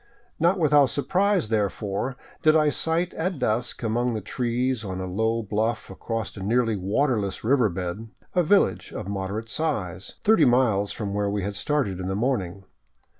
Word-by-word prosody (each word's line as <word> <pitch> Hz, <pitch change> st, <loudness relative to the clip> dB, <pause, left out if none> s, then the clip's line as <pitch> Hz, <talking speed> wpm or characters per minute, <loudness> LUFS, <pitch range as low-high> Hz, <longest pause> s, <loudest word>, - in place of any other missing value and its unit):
Not 175 Hz, +4 st, +3 dB
without 150 Hz, -4 st, +5 dB
surprise, 185 Hz, -, +1 dB
therefore, 105 Hz, +3 st, -1 dB, 0.2 s
did 155 Hz, -1 st, +5 dB
I 155 Hz, -1 st, +4 dB
sight 165 Hz, +4 st, 0 dB
at 180 Hz, +1 st, -2 dB
dusk, 120 Hz, -1 st, -1 dB
among 120 Hz, +1 st, 0 dB
the 110 Hz, -, -3 dB
trees 125 Hz, +2 st, -1 dB
on 95 Hz, -2 st, -4 dB
a 95 Hz, -, -3 dB
low 110 Hz, +5 st, 0 dB
bluff 110 Hz, +1 st, -2 dB
across 115 Hz, +3 st, -4 dB
a 100 Hz, -, -8 dB
nearly 115 Hz, +2 st, +1 dB
waterless 100 Hz, 0 st, 0 dB
river 120 Hz, -1 st, +3 dB
bed, 90 Hz, +5 st, -5 dB, 0.2 s
a 180 Hz, -, +3 dB
village 195 Hz, +4 st, +2 dB
of -, -, -6 dB
moderate 100 Hz, +3 st, -3 dB
size, 100 Hz, -, -3 dB
thirty 220 Hz, +1 st, +5 dB
miles 120 Hz, -5 st, +3 dB
from 100 Hz, -3 st, -4 dB
where 100 Hz, 0 st, 0 dB
we 100 Hz, -1 st, -2 dB
had 100 Hz, +1 st, -3 dB
started 125 Hz, -, -1 dB
in 90 Hz, -, -4 dB
the 95 Hz, -, -1 dB
morning. 100 Hz, -5 st, -1 dB
115 Hz, 170 wpm, -25 LUFS, 100-140 Hz, 0.2 s, without